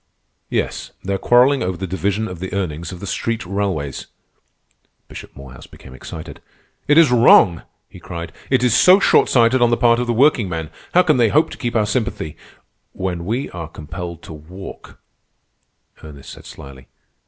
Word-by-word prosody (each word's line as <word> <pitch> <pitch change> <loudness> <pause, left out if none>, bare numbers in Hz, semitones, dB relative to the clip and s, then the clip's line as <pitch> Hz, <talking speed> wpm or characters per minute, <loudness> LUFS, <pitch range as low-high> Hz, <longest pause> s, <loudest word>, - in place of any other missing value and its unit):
"Yes, - - -3
they're 95 0 -2
quarrelling 130 +3 +4
over 90 -1 -2
the 95 - -4
division 100 +4 -2
of 90 -4 -8
the 95 +1 -6
earnings 85 -4 -4
of 90 - -10
the - - -6
street 115 +2 -3
railways." 90 -8 -3 1.0
Bishop - - -11
Morehouse 65 -2 -12
became 65 - -15
excited. 80 +4 -10 0.5
"It 145 +2 +4
is 165 -5 +6
wrong!" 115 -8 +5 0.3
he - - -14
cried. 85 -1 -7 0.2
"It 130 -2 +2
is 125 -2 +3
so 185 +8 +6
short - - +3
sighted 120 +1 +3
on 120 - +4
the 120 - +1
part 120 -1 +3
of 125 - -2
the 120 - 0
workingmen. 105 - +1 0.2
How 180 - +6
can 155 -6 +2
they 115 -3 +3
hope 155 +7 +2
to - - -9
keep 120 -2 -3
our 110 -2 +2
sympathy—" 105 - -3 0.6
"When 90 -2 -4
we 120 +8 -3
are 85 -2 -7
compelled 85 +2 -8
to - - -10
walk," 90 +6 -11 1.1
Ernest 70 -3 -11
said - - -13
slyly. 65 -1 -12
95 Hz, 175 wpm, -19 LUFS, 85-120 Hz, 1.1 s, is